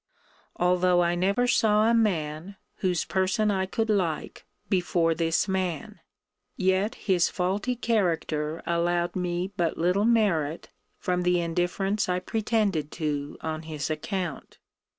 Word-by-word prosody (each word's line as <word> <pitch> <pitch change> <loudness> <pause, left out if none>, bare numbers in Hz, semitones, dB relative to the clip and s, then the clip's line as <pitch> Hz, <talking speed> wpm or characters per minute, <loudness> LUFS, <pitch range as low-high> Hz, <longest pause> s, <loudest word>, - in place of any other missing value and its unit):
Although 180 0 +3
I 170 0 +1
never 195 +7 +1
saw 215 -3 +3
a 230 - +4
man, 180 -5 0 0.2
whose 180 -3 0
person 190 +3 +1
I 190 -1 0
could 225 +4 -1
like, 175 -7 -2 0.2
before 175 -3 +1
this 165 +2 +1
man; 190 +3 -2 0.6
yet 190 +4 +1
his 180 -4 +1
faulty 200 +7 -1
character 165 -9 -1
allowed 170 0 0
me 180 +1 -2
but 170 -2 0
little 180 +5 +2
merit 180 -10 +1 0.3
from 180 0 -1
the 180 0 +2
indifference 175 +4 -1
I 180 - +1
pretended 200 -5 -1
to 145 -3 -3
on 160 -1 -3
his 155 -2 -4
account. 170 0 -4
180 Hz, 130 wpm, -27 LUFS, 165-200 Hz, 0.6 s, a